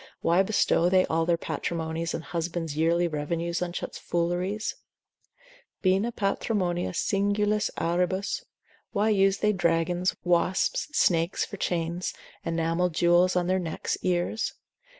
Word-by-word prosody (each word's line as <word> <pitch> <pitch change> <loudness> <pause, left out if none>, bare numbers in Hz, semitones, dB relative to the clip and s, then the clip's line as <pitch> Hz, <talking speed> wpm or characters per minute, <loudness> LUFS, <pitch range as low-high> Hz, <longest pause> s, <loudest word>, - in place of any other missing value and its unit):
why 170 +3 +4
bestow 190 -3 +2
they 185 0 +4
all 165 0 0
their 170 -1 +3
patrimonies 165 0 -3
and 165 - -5
husbands' 165 -2 -3
yearly 170 +2 +2
revenues 170 +3 -2
on 180 -1 -1
such 175 - -5
fooleries? 180 +5 -1 1.1
bina 195 +5 +2
patrimonia 195 -4 -1
singulis 205 +3 +1
auribus; 180 +3 0 0.5
why 210 +2 +2
use 195 -2 +3
they 210 +1 +2
dragons, 175 0 +1
wasps, 175 +1 +1
snakes, 170 - +2
for 200 - -8
chains, 170 0 -2 0.3
enamelled 165 +1 0
jewels 175 +2 +4
on 180 -1 +2
their 185 +1 +1
necks, 165 -3 -2
ears? 180 +4 -1
175 Hz, 125 wpm, -27 LUFS, 170-190 Hz, 1.1 s, why